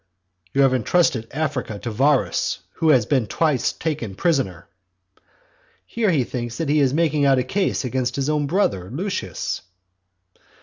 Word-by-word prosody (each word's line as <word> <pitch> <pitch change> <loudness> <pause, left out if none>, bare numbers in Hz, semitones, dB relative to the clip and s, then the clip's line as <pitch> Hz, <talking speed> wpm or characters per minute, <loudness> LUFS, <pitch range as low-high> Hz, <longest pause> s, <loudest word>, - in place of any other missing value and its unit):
"You 140 - +3
have 135 -1 +4
entrusted 125 -2 +1
Africa 135 -7 -2
to 115 +3 -5
Varus, 130 -4 +1 0.2
who 160 - +2
has 130 -7 +5
been 130 -5 +1
twice 150 0 +1
taken 140 - -4
prisoner". 125 - 0 1.2
Here 225 -3 0
he 150 -8 +2
thinks 120 -1 -5
that 160 - -2
he 150 +1 +3
is 135 -3 +3
making 155 -1 +1
out 135 -1 +4
a 125 - +2
case 185 +1 -1
against 125 0 -1
his 135 -1 -1
own 150 -1 0
brother 100 - 0
Lucius. 135 - -3
135 Hz, 150 wpm, -22 LUFS, 120-155 Hz, 1.2 s, has